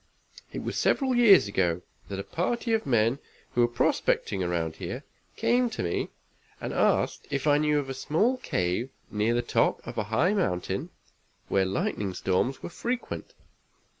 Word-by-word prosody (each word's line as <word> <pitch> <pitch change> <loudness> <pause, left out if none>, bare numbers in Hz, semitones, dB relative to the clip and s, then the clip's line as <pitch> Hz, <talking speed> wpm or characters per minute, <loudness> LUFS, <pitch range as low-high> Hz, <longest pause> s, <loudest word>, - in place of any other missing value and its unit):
It - - -5
was - - -2
several 265 -2 +2
years 210 - +7
ago 90 -3 0 0.3
that 100 - -4
a 100 - -3
party 230 - -1
of 220 -6 0
men 120 +1 +3 0.3
who 120 - +3
were 120 - +5
prospecting 115 -4 +1
around 85 -2 -1
here - - -5 0.3
came 245 0 +2
to 225 - -4
me 85 - -1 0.5
and - - -4
asked - - +1
if 140 -1 -2
I 145 -1 +5
knew 150 0 +2
of 145 -2 -1
a 135 - -3
small 185 - +1
cave 95 - -1 0.2
near 110 +3 +1
the 120 - +1
top - - +1
of - - -4
a 105 - -1
high 110 - +2
mountain, 170 - -1 0.6
where 95 -1 +3
lightning 95 0 -2
storms 95 +8 0
were - - -4
frequent. 240 +7 -4
120 Hz, 165 wpm, -28 LUFS, -, 0.6 s, years